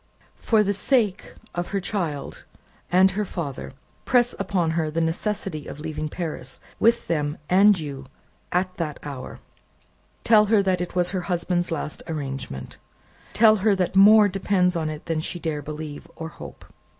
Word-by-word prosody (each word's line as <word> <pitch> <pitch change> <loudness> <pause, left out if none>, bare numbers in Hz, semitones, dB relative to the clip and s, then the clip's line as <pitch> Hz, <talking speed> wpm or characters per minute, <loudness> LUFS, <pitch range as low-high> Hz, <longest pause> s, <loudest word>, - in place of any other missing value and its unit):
"For 220 -2 +3
the 200 0 0
sake 210 -1 0 0.2
of 175 0 -3
her 200 - -1
child 175 -8 -4 0.5
and 185 +2 +5
her 210 +2 -1
father, 140 - -5 0.3
press 245 -1 +3
upon 185 -4 0
her 160 -1 0
the 160 +2 -2
necessity 165 -1 -2
of - - -8
leaving 155 0 -4
Paris, 150 -6 -5 0.2
with 230 +1 +3
them 150 -2 -1
and 200 +1 +6
you, 140 -3 -7 0.4
at 185 +1 -1
that 155 -4 -3
hour. 140 -3 -7 0.8
Tell 215 -2 +6
her 210 -1 +3
that 185 -2 +1
it 180 +1 -5
was 180 0 +1
her 185 -2 -2
husband's 175 0 -1
last 150 -2 -4
arrangement. 135 - -5 0.5
Tell 220 -1 +6
her 205 +1 +3
that 185 0 -1
more 210 +2 +8
depends 185 -2 +1
upon 160 -2 -1
it 155 0 -7
than 165 -2 -1
she 175 +3 -3
dare 155 -3 -3
believe, 150 +1 -7
or 160 0 -6
hope. - - -11
175 Hz, 160 wpm, -24 LUFS, 155-195 Hz, 0.8 s, more